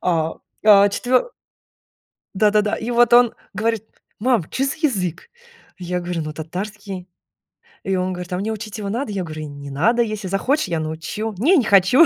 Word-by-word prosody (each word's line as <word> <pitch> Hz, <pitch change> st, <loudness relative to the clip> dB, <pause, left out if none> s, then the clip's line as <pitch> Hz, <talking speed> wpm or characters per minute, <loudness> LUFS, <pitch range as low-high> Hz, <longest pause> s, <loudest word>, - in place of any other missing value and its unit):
а, 165 Hz, -2 st, 0 dB, 0.3 s
а 205 Hz, -1 st, +8 dB
четвё 250 Hz, -, +1 dB, 1.1 s
Да 210 Hz, +2 st, +4 dB
да 210 Hz, 0 st, +4 dB
да. 210 Hz, +1 st, -1 dB
И 230 Hz, +2 st, -4 dB
вот 240 Hz, 0 st, +4 dB
он 240 Hz, -1 st, +6 dB, 0.2 s
говорит: 220 Hz, +1 st, -1 dB, 0.3 s
"Мам, 235 Hz, -4 st, +2 dB
чё 265 Hz, -, -1 dB
за 270 Hz, -, -2 dB
язык?" 190 Hz, -, -1 dB, 0.5 s
Я 180 Hz, 0 st, -3 dB
говорю 175 Hz, -1 st, -3 dB
ну 155 Hz, -, -5 dB
татарский. 185 Hz, +4 st, -6 dB, 0.8 s
И 195 Hz, -, 0 dB
он 185 Hz, 0 st, 0 dB
говорит, 180 Hz, 0 st, -6 dB
а 180 Hz, -, 0 dB
мне 210 Hz, +4 st, -2 dB
учить 215 Hz, 0 st, -6 dB
его 200 Hz, -, -3 dB
надо. 235 Hz, +2 st, -2 dB
Я 190 Hz, -2 st, -2 dB
говорю 155 Hz, -1 st, -6 dB
не 140 Hz, 0 st, -9 dB
надо, 215 Hz, -, +2 dB
если 215 Hz, -4 st, -2 dB
захочешь, 230 Hz, +7 st, +1 dB
я 165 Hz, -2 st, -1 dB
научу. 160 Hz, +8 st, -4 dB
"Не, 315 Hz, -, +4 dB
не 270 Hz, -, +3 dB
хочу". 205 Hz, -, +6 dB
200 Hz, 185 wpm, -21 LUFS, 180-230 Hz, 1.1 s, а